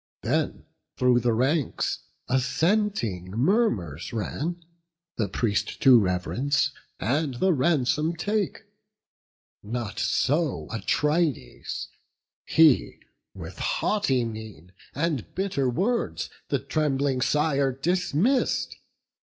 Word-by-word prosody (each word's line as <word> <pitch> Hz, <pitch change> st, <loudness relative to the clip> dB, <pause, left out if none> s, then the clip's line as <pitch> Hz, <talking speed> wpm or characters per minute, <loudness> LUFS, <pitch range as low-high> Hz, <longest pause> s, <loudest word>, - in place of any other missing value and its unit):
Then -, -, -1 dB, 0.3 s
through 125 Hz, -1 st, +4 dB
the 120 Hz, 0 st, +1 dB
ranks 135 Hz, +6 st, 0 dB, 0.3 s
assenting 135 Hz, -, 0 dB
murmurs 110 Hz, -, 0 dB
ran, 160 Hz, +9 st, -3 dB, 0.5 s
The 105 Hz, -4 st, 0 dB
priest 105 Hz, 0 st, -1 dB
to 130 Hz, -3 st, +8 dB
rev'rence, 125 Hz, +10 st, 0 dB, 0.3 s
and 140 Hz, +2 st, 0 dB
the 185 Hz, +9 st, +2 dB
ransom 150 Hz, +2 st, +1 dB
take: 205 Hz, +3 st, -2 dB, 1.0 s
Not 110 Hz, -1 st, -4 dB
so 150 Hz, +2 st, 0 dB
Atrides; 150 Hz, -, -1 dB, 0.6 s
he, 160 Hz, -5 st, +4 dB, 0.4 s
with -, -, -9 dB
haughty 135 Hz, -, +1 dB
mien 110 Hz, -7 st, -8 dB, 0.2 s
And 145 Hz, -5 st, -2 dB
bitter 185 Hz, -9 st, 0 dB
words, 205 Hz, -, -1 dB, 0.2 s
the -, -, +2 dB
trembling 140 Hz, -4 st, 0 dB
sire 140 Hz, 0 st, +2 dB
dismiss'd. 180 Hz, -, 0 dB
140 Hz, 90 wpm, -26 LUFS, 115-165 Hz, 1.0 s, to